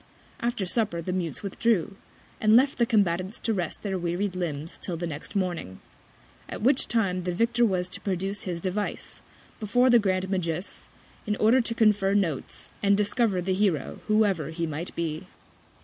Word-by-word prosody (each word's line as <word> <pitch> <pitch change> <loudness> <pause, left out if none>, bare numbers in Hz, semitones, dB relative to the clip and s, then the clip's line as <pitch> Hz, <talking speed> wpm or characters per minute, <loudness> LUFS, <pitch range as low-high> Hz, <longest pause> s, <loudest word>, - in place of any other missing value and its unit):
After 235 -4 -1
Supper 205 -2 0
the 180 - -2
Mutes 180 -1 -3
withdrew, 200 -1 0 0.4
and 215 0 +5
left 270 +3 +4
the 235 - +3
Combatants 190 -2 +1
to 225 - 0
rest 175 -5 -3
their 195 -3 -2
wearied 175 +3 -1
Limbs 160 -3 -4
till 175 -3 -3
the 175 - -3
next 155 +5 -7
Morning; 175 - -2 0.7
at - - -6
which 260 +2 +3
Time 195 -6 +1
the 180 0 -2
Victor 235 +6 +2
was 185 -5 +1
to 185 - -4
produce 195 +1 -2
his 175 -3 -3
Device, 195 +4 -3 0.4
before 245 +4 +3
the 240 - +7
Grand 190 -2 0
Magus, 180 -1 -3 0.4
in 210 - +1
order 230 +5 +4
to 230 0 -2
confer 205 -3 +3
Notes, 170 -9 -2
and 200 0 +4
discover 205 -2 +1
the 190 +1 0
Hero 185 -6 0
whoever 205 -8 +2
he 165 +1 -2
might 160 +2 -3
be. 165 +1 -3
190 Hz, 170 wpm, -27 LUFS, 175-215 Hz, 0.7 s, the